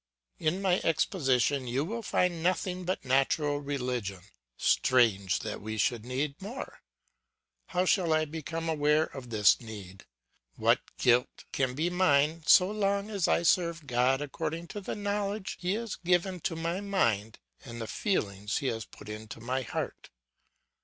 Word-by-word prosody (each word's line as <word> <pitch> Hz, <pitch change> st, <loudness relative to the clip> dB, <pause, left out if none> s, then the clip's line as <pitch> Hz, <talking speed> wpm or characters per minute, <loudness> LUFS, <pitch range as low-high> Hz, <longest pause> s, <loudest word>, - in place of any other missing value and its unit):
"In 175 Hz, +5 st, 0 dB
my 185 Hz, -1 st, +2 dB
exposition 140 Hz, -5 st, +1 dB
you 155 Hz, -, -2 dB
find 180 Hz, -5 st, 0 dB
nothing 180 Hz, +1 st, 0 dB
but 185 Hz, -6 st, -2 dB
natural 145 Hz, +3 st, +2 dB
religion; 125 Hz, -9 st, -3 dB, 0.4 s
strange 105 Hz, -8 st, +3 dB
that -, -, -5 dB
we 110 Hz, +1 st, -5 dB
should 115 Hz, +1 st, 0 dB
need 140 Hz, +4 st, -2 dB
more! 220 Hz, +7 st, -7 dB, 0.9 s
How 180 Hz, 0 st, 0 dB
shall 180 Hz, -3 st, +2 dB
I 155 Hz, 0 st, +3 dB
become 165 Hz, +2 st, -5 dB
aware 150 Hz, -1 st, +3 dB
of 135 Hz, -5 st, -8 dB
this 105 Hz, -1 st, +4 dB
need? 100 Hz, -5 st, -10 dB, 0.5 s
What -, -, +3 dB, 0.2 s
guilt 125 Hz, 0 st, +2 dB
can 130 Hz, -2 st, 0 dB
be 165 Hz, +5 st, 0 dB
mine 160 Hz, -3 st, +3 dB
so 185 Hz, +1 st, +7 dB
long 200 Hz, 0 st, 0 dB
as 195 Hz, -4 st, 0 dB
I -, -, +2 dB
serve 170 Hz, -2 st, +2 dB
God 130 Hz, +1 st, +2 dB
according 160 Hz, +4 st, -4 dB
to 205 Hz, -, -6 dB
the -, -, -4 dB
knowledge 205 Hz, -1 st, -2 dB
he 180 Hz, +2 st, 0 dB
has 230 Hz, -1 st, -3 dB
given 180 Hz, +1 st, +1 dB
to 165 Hz, +1 st, -2 dB
my 165 Hz, +3 st, -2 dB
mind, 115 Hz, -, 0 dB, 0.3 s
and 120 Hz, -2 st, -8 dB
the 115 Hz, -, -3 dB
feelings 105 Hz, -, -1 dB
he 140 Hz, -, -3 dB
has 115 Hz, -1 st, -4 dB
put -, -, -14 dB
into 110 Hz, +1 st, -7 dB
my 125 Hz, +3 st, -2 dB
heart? 125 Hz, -, -5 dB
150 Hz, 155 wpm, -29 LUFS, 125-180 Hz, 0.9 s, so